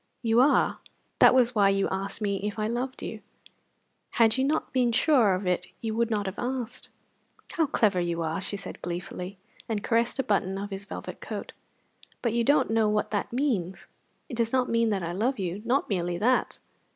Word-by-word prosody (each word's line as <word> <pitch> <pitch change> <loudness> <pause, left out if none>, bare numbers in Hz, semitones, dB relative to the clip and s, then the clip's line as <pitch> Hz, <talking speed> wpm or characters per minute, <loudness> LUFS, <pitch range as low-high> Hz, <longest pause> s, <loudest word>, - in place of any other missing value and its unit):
"You 230 0 +3
are. 280 - +3 0.4
That - - +7
was 245 -1 +4
why 200 -3 +4
you 195 0 +2
asked 195 +2 -3
me 200 -2 0
if 205 +2 -4
I 215 - -1
loved 245 +3 -3
you. - - -6 1.0
Had 225 -2 +5
you 260 - +1
not 300 +3 -1
been 250 -2 +2
sure 230 - +4
of 185 +2 -4
it 180 0 0
you 225 -1 -3
would 230 +1 +1
not 210 -2 -1
have 190 +1 -5
asked." 245 -1 -4 0.6
"How 320 -3 +1
clever 205 -8 +2
you 170 -1 -1
are!" 160 +2 -2
she 200 +1 -4
said 200 - -8
gleefully, 180 +2 -5 0.3
and 215 -2 -2
caressed 230 +1 +1
a 270 - +1
button 195 -3 0
of 200 +1 -5
his 195 +1 -5
velvet - - -7
coat. - - -6 0.7
"But 235 -3 +1
you 235 0 +2
don't 285 -1 +3
know 225 -1 +3
what 210 0 0
that 205 -2 -2
means! 230 -9 -1 0.4
It 245 - -6
does 230 -1 +1
not 255 -1 +1
mean 230 0 +2
that 195 -4 -1
I 170 - -3
love 230 +9 0
you 190 0 -3
not 255 +4 +1
merely 175 -3 -1
that." 250 +7 +1
215 Hz, 200 wpm, -27 LUFS, 195-240 Hz, 1.0 s, That